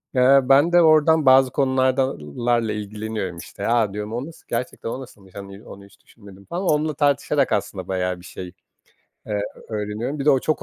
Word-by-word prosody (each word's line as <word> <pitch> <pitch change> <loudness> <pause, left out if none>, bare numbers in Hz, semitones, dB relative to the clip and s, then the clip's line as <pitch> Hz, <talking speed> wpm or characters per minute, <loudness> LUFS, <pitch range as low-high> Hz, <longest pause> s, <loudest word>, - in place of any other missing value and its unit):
Eee, 130 +2 +6
ben 140 +6 +4
de 175 0 +6
oradan 155 -1 +4
bazı 130 0 +6
konularla 130 - 0
ilgileniyorum, 105 -3 -5
işte. 85 - -7
A, 115 -4 +1
diyorum, 105 +1 -5
o 120 +3 -3
nasıl 165 +1 -14
gerçekten 120 -1 -4
o 130 - -5
nasılmış? 100 -7 -15
Hani, 100 +1 -10
onu 100 0 -12
hiç 100 - -22
düşünmedim 100 -3 -16
falan. 175 - -4
Onunla 150 0 +1
tartışarak 140 0 +1
aslında 95 -2 -2
bayağı 90 -1 -2
bir 90 - -15
şey, 90 0 -9 0.8
eee, 105 -1 -2 0.3
öğreniyorum. 110 +6 -4
Bir 140 - -3
de 150 - +5
o 135 - +3
çok 155 - -1
120 Hz, 180 wpm, -22 LUFS, 100-140 Hz, 0.8 s, Eee